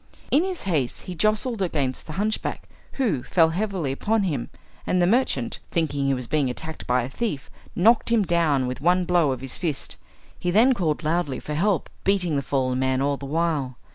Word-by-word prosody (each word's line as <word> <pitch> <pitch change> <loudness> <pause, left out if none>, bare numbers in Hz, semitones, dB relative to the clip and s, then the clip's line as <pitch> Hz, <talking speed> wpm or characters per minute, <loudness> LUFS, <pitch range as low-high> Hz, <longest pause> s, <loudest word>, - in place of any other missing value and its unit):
In 295 +5 +4
his 375 -2 -4
haste 155 -10 -1
he 180 - -6
jostled 215 +5 +1
against 145 -8 -1
the 155 - -6
hunchback, 210 +5 -2 0.3
who 220 - 0
fell 165 +4 +3
heavily 185 -4 -2
upon 215 +10 0
him, 145 -10 -2 0.4
and 180 - +2
the 175 - +4
merchant, 185 - +1
thinking 145 -4 0
he 135 0 +2
was 125 -1 -4
being 140 +1 +1
attacked 160 +5 -6
by 125 0 +2
a - - -3
thief, 150 - -4 0.2
knocked 225 +5 +4
him 230 -3 +4
down 165 -7 +2
with 125 +2 -4
one 180 +3 +3
blow 175 -4 +3
of 130 -2 -4
his 135 -1 -3
fist. 160 -6 -3 0.4
He 180 - -1
then 225 +8 +5
called 165 -8 -1
loudly 155 -4 0
for 150 - -6
help, 185 +4 +1 0.2
beating 185 -5 +1
the 140 - +1
fallen 130 -2 0
man 130 0 +1
all 140 +1 +1
the 140 - -7
while. 150 -5 -1
160 Hz, 200 wpm, -24 LUFS, 135-195 Hz, 0.4 s, then